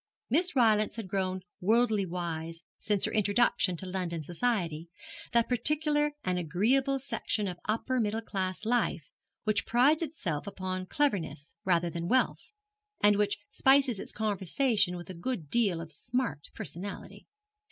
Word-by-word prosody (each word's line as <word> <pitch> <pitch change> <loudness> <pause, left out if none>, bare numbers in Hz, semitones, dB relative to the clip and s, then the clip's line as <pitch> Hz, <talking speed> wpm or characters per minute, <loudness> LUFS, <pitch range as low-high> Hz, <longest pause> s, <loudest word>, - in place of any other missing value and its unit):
Miss 350 +6 +2
Rylance 215 -4 +3
had 225 -4 -5
grown 185 -1 -1 0.2
worldly 215 0 +3
wise 165 -1 -4 0.2
since 205 -2 +1
her - - -1
introduction 205 -3 +2
to 190 - -6
London 180 -3 -3
society, 175 - -1 0.4
that 235 -1 +3
particular 295 +3 +1
and 180 -1 0
agreeable 235 - +2
section 225 -5 -2
of 180 -1 -5
upper 240 +4 0
middle 220 -1 0
class 190 -1 -3
life 245 +2 0 0.3
which 215 -2 +1
prides 270 +7 +4
itself 205 - -3
upon 185 -1 -4
cleverness 165 - -1
rather 175 -2 +2
than 170 0 -4
wealth, 260 +6 +1 0.5
and 205 0 +5
which 205 -1 +1
spices 270 -5 +4
its - - -3
conversation 210 - +1
with 175 +1 -8
a - - -6
good 175 - -4
deal 205 -8 +2
of 165 -1 -7
smart 240 - -2
personality. 180 +7 -7
205 Hz, 140 wpm, -30 LUFS, 175-245 Hz, 0.5 s, and